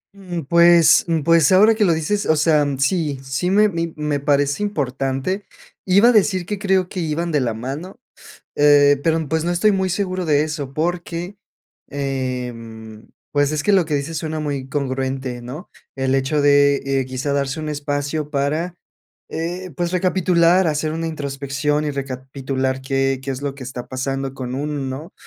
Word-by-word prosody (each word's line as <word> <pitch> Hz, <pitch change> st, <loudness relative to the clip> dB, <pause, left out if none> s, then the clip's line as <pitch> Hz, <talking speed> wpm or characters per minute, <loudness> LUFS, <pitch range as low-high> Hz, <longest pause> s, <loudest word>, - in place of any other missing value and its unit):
Um, 180 Hz, -5 st, -6 dB
pues, 170 Hz, +1 st, +6 dB
um, 165 Hz, -3 st, 0 dB
pues, 165 Hz, -2 st, +4 dB
ahora 210 Hz, +4 st, +6 dB
que 215 Hz, -2 st, +2 dB
lo 170 Hz, -, +3 dB
dices, 180 Hz, +6 st, -1 dB
o 160 Hz, -, +4 dB
sea, 150 Hz, -1 st, +3 dB
sí, 145 Hz, 0 st, 0 dB
sí, 135 Hz, +7 st, -2 dB
me 210 Hz, +2 st, +5 dB
mi 170 Hz, -3 st, -3 dB
me 150 Hz, -1 st, -1 dB
parece 145 Hz, +4 st, +1 dB
importante. 140 Hz, +1 st, -2 dB, 0.4 s
Iba 200 Hz, +6 st, +6 dB
a -, -, +6 dB
decir 190 Hz, -4 st, +2 dB
que 205 Hz, +2 st, -4 dB
creo 190 Hz, -3 st, +1 dB
que 185 Hz, -, -6 dB
iban 165 Hz, +1 st, -2 dB
de 150 Hz, -, +2 dB
la 115 Hz, -3 st, -1 dB
mano, 145 Hz, -, -6 dB, 0.6 s
eh, 145 Hz, -1 st, +5 dB
pero, 160 Hz, -1 st, +1 dB
pues, 160 Hz, 0 st, 0 dB
no 175 Hz, -, 0 dB
estoy 195 Hz, +5 st, +3 dB
muy 190 Hz, -1 st, 0 dB
seguro 185 Hz, -1 st, -2 dB
de 150 Hz, -1 st, +3 dB
eso 150 Hz, -3 st, -5 dB
porque, 175 Hz, +3 st, -3 dB, 0.5 s
em, 125 Hz, -5 st, -5 dB, 0.2 s
pues, 145 Hz, 0 st, +2 dB
es 150 Hz, -, -1 dB
que 205 Hz, -, +2 dB
lo 190 Hz, -4 st, +4 dB
que 155 Hz, -, -1 dB
dices 150 Hz, +3 st, -3 dB
suena 155 Hz, 0 st, -3 dB
muy 140 Hz, -3 st, -3 dB
congruente, 130 Hz, -2 st, -3 dB
¿no?, 135 Hz, +10 st, -9 dB, 0.3 s
el 135 Hz, 0 st, 0 dB
hecho 135 Hz, +2 st, +1 dB
de, 145 Hz, 0 st, +4 dB
eh, 135 Hz, -1 st, 0 dB
quizá 130 Hz, +2 st, -3 dB
darse 140 Hz, +2 st, -1 dB
un 155 Hz, -, -4 dB
espacio 145 Hz, 0 st, -3 dB
para, 155 Hz, +5 st, -1 dB, 0.5 s
eh, 175 Hz, +3 st, -4 dB
pues, 175 Hz, 0 st, -1 dB
recapitular, 180 Hz, -1 st, +3 dB
hacer 155 Hz, +1 st, -1 dB
una 165 Hz, 0 st, -3 dB
introspección 145 Hz, 0 st, -2 dB
y 145 Hz, -, -1 dB
recapitular 130 Hz, 0 st, -3 dB
qué 135 Hz, 0 st, 0 dB
qué 135 Hz, -, -5 dB
es 130 Hz, +1 st, -6 dB
lo 140 Hz, -1 st, -3 dB
que 135 Hz, -, -9 dB
está 125 Hz, -1 st, -7 dB
pasando 135 Hz, +1 st, -3 dB
con 130 Hz, -1 st, -5 dB
uno, 145 Hz, +1 st, -3 dB
¿no? 135 Hz, +6 st, -6 dB
150 Hz, 180 wpm, -20 LUFS, 135-170 Hz, 0.6 s, pues